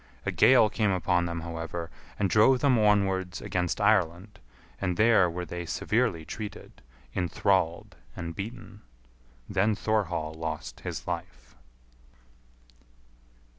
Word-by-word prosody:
A - - 0
gale 130 -4 +6
came 105 0 0
upon 90 -2 +1
them, 85 0 -4
however, 85 0 -5 0.3
and 100 - +1
drove 110 +8 +5
them 130 -5 +4
onwards 95 -3 +2
against 90 -1 -2
Ireland, 100 -1 +1 0.4
and 90 -3 -1
there 105 -5 +5
were 90 +1 -4
they 85 +1 -5
severely 105 -8 0
treated, 105 +3 -8 0.3
enthralled, 90 -1 0 0.2
and 85 -1 -6
beaten. 105 -1 -8 0.7
Then 100 +2 +1
Thorhall 95 -8 -1
lost 80 -6 -5
his - - -6
life. - - -6
95 Hz, 115 wpm, -28 LUFS, 85-105 Hz, 0.7 s, gale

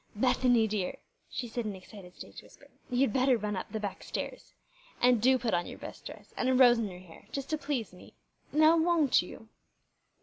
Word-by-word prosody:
"Bethany, 245 0 +3
dear," 205 -4 -2 0.3
she 245 - -4
said 235 +1 -4
in 210 -2 -4
an - - -8
excited 185 -1 -13
stage - - -10
whisper, - - -19 0.2
"you'd 250 -2 +1
better 260 -1 +3
run 210 -1 -3
up 185 - -6
the 220 - -3
back 205 -2 -5
stairs. - - -6 0.4
And 245 -3 +4
do 260 +2 +5
put 240 -4 -2
on 175 0 0
your - - -8
best - - -9
dress, - - -12
and 255 - +1
a 260 - +3
rose 245 -2 +6
in 225 - -1
your 180 -2 -9
hair, 170 -3 -16
just 275 +1 -5
to 310 - +1
please 260 -11 -3
me. 180 - -15 0.4
Now, 310 +2 +5
won't 320 -4 +3
you?" 200 +5 -11
240 Hz, 210 wpm, -30 LUFS, 205-260 Hz, 0.4 s, rose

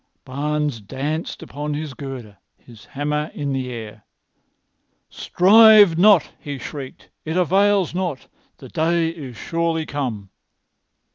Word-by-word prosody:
Barnes 145 -2 -2
danced 140 +9 -5
upon 150 +1 -5
his 150 -2 -5
girder, 130 -7 -9 0.2
his 115 -4 -17
hammer 150 +2 -3
in 140 -2 -3
the 130 -1 -3
air. 110 -3 -9 1.1
"Strive 210 -1 +6
not!" 190 -1 +4
he 145 -1 -6
shrieked. 135 +1 -9
"It 160 +3 -3
avails 195 +1 +2
not. 175 -7 -4 0.3
The - - -12
day 165 0 0
is 140 -8 -9
surely 165 -1 -2
come." 120 -11 -5
150 Hz, 120 wpm, -21 LUFS, 130-170 Hz, 1.1 s, Strive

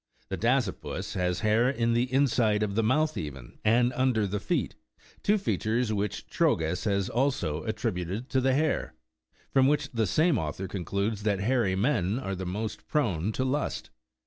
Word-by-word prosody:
The - - -2
dasypus 120 -4 -1
lias 90 -1 0
hair 110 +3 +3
in 115 -3 +1
the 120 +2 +1
inside 120 -6 +2
of 100 -2 -1
the 115 - +2
mouth 150 +7 +2
even 70 -5 -7
and 120 +3 +3
under 125 -4 +2
the 100 +1 -2
feet/ 160 - -1 0.5
two 210 +1 +3
features 120 - 0
which 105 -1 -2
Trogus 80 +4 +1
has 100 -2 +1
also 125 - 0
attributed 90 +7 -3
to 130 - +1
the 130 0 +2
hare; 155 - 0 0.6
from 135 -1 +5
which 145 0 +1
the 115 -3 0
same 155 - +3
author 80 +4 -4
concludes 100 +3 -2
that 105 -2 0
hairy 115 -4 +1
men 105 -2 +1
are 110 -7 -3
the 95 -1 -4
most 105 +4 -4
prone 105 - 0
to 130 - -1
lust. 140 +3 -2
110 Hz, 170 wpm, -28 LUFS, 95-130 Hz, 0.6 s, from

